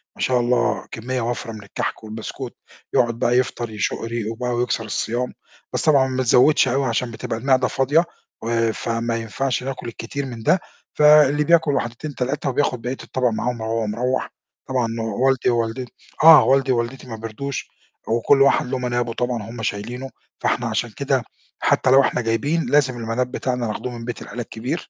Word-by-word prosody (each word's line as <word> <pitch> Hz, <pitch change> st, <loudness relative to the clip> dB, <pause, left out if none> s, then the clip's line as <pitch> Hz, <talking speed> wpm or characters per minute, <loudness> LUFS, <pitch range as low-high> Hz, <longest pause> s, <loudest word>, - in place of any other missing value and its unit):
ما -, -, -10 dB
شاء 125 Hz, -1 st, +2 dB
الله 120 Hz, 0 st, +1 dB
كمّية 125 Hz, +2 st, -3 dB
وَفْرة 115 Hz, -1 st, -3 dB
من 110 Hz, -2 st, -9 dB
الكَحْك 100 Hz, +2 st, -4 dB
والبسكوت، 110 Hz, +4 st, -7 dB, 0.4 s
يقعُد 115 Hz, -1 st, +2 dB
بقى 125 Hz, 0 st, +3 dB
يفطر 120 Hz, -2 st, -1 dB
يشُق 105 Hz, -2 st, -2 dB
ريقه 115 Hz, -1 st, -3 dB
وبقى 125 Hz, +2 st, -3 dB
ويكسر 120 Hz, -1 st, -1 dB
الصيام، 120 Hz, +4 st, -2 dB, 0.4 s
بس -, -, 0 dB
طبعًا 140 Hz, -4 st, +5 dB
ما 130 Hz, 0 st, -1 dB
تزوِّدش 130 Hz, +4 st, +5 dB
أوي 135 Hz, +2 st, +1 dB
عشان 120 Hz, 0 st, -1 dB
بتبقى 110 Hz, 0 st, -4 dB
المِعدة 130 Hz, +1 st, +3 dB
فاضية، 145 Hz, +6 st, +2 dB, 0.4 s
و 115 Hz, -1 st, +1 dB
فما 115 Hz, +1 st, -2 dB
ينفعش 120 Hz, +4 st, -2 dB
ناكُل 130 Hz, -3 st, -5 dB
كتير 135 Hz, +5 st, -5 dB
من 120 Hz, -4 st, -7 dB
ده، 185 Hz, -, +4 dB, 0.3 s
فاللي 150 Hz, -1 st, +6 dB
بياكُل 160 Hz, -2 st, +4 dB
واحدتين، 135 Hz, +3 st, -3 dB
3 135 Hz, +3 st, -1 dB
وبياخُد 125 Hz, -2 st, 0 dB
بقية 125 Hz, +2 st, -3 dB
الطبق 130 Hz, -1 st, 0 dB
معاهم 120 Hz, +1 st, -2 dB
وهو 110 Hz, 0 st, -1 dB
مروح. 125 Hz, +5 st, -1 dB, 0.4 s
طبعًا 125 Hz, -3 st, +1 dB, 0.3 s
والدي 135 Hz, -1 st, +3 dB
ووالدت 120 Hz, +1 st, -1 dB, 0.4 s
آه، 160 Hz, -1 st, +10 dB
والدي 135 Hz, 0 st, +3 dB
ووالدتي 125 Hz, +2 st, -2 dB
ما 115 Hz, -, -6 dB
بيرضوش 115 Hz, +5 st, -5 dB, 0.4 s
وكل 120 Hz, +5 st, +3 dB
واحد 140 Hz, -, +4 dB
له 130 Hz, +1 st, -2 dB
منابه 120 Hz, -2 st, -1 dB
طبعًا 120 Hz, -2 st, -2 dB
هم 115 Hz, 0 st, -7 dB
شايلينه، 120 Hz, +6 st, -4 dB, 0.3 s
فإحنا -, -, 0 dB
عشان -, -, -1 dB
كده -, -, -1 dB, 0.4 s
حتّى -, -, +2 dB
لو 135 Hz, +1 st, +7 dB
إحنا 125 Hz, -, 0 dB
جايبين، 140 Hz, +9 st, 0 dB
لازم 130 Hz, -4 st, +3 dB
المناب 120 Hz, +2 st, -2 dB
بتاعنا 125 Hz, -3 st, -2 dB
ناخده 110 Hz, +3 st, -4 dB
من 120 Hz, -1 st, -7 dB
بيت 120 Hz, -1 st, -5 dB
العيلة 120 Hz, -, -6 dB
الكبير. 120 Hz, +8 st, -5 dB
125 Hz, 175 wpm, -22 LUFS, 115-135 Hz, 0.4 s, آه